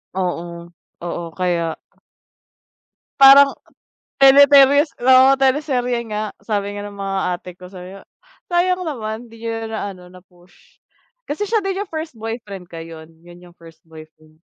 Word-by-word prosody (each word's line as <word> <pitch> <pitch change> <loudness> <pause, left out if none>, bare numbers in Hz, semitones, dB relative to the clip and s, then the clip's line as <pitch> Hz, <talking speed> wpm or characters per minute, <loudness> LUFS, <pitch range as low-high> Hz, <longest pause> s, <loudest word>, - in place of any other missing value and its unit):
Oo, 170 -2 -5 0.3
oo, 175 0 -5
kaya 170 -3 -2 1.4
Parang 275 +1 +8 0.7
teleteryes 280 +1 +6
oo, 260 +1 +6
teleserye 260 -3 0
nga, 215 -1 -4 0.2
sabi 205 -1 -3
nga 205 - -6
ng 205 - -10
mga 195 -1 -4 0.2
ate 180 +1 -9
ko, 180 - -12
sabi 185 +1 -11
nga, - - -19 0.4
sayang 360 +1 0
naman 230 -5 -5
di 230 0 -16
niya 225 -1 -4
na 220 -2 -5
naano 180 -2 -13
na-push. 180 0 -22 0.5
Kasi 300 +8 -4
siya 450 - +2
din 390 -1 -3
yung 410 - -11
first 315 -2 -6
boyfriend 220 -5 -8
ko, 165 - -9
yun 165 -1 -11 0.3
yung 175 - -15
first 165 -1 -17
boyfriend, 155 -1 -17
215 Hz, 140 wpm, -19 LUFS, 180-270 Hz, 1.4 s, Parang